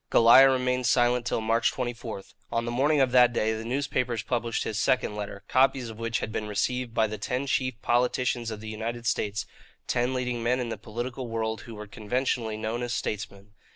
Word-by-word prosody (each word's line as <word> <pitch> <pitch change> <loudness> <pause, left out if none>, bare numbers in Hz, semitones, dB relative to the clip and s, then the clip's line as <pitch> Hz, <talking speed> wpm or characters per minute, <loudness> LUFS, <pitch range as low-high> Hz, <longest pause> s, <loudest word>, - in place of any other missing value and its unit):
Goliah 120 +4 +8
remained 125 -1 +1
silent 120 -1 +3
till 115 - 0
March 115 +1 +2
24. 120 -5 -5 0.3
On 115 0 0
the 120 - -2
morning 140 +4 +3
of 130 -2 +3
that 125 -1 +6
day, 110 -1 +1
the 110 0 -4
newspapers 125 -2 -1
published 115 0 -1
his 110 0 -3
second 105 0 +1
letter, 100 -1 -6
copies 130 -2 +2
of 110 - -12
which 115 0 -1
had 110 - -4
been 105 0 -3
received 120 +4 -1
by 110 - +4
the 110 0 -5
ten 130 +2 -2
chief 130 -3 -1
politicians 120 0 +1
of 110 -2 -6
the 110 - -8
United 115 +2 -4
States 105 -1 -1 0.4
ten 125 +2 0
leading 125 -2 -2
men 125 +2 +1
in 120 -2 -2
the - - -3
political 120 +3 -5
world 110 -1 -2
who 115 - -10
were 105 0 -7
conventionally 110 +1 -2
known 110 +2 -3
as 120 0 -2
"statesmen." 100 -1 -5
120 Hz, 200 wpm, -27 LUFS, 110-125 Hz, 0.4 s, Goliah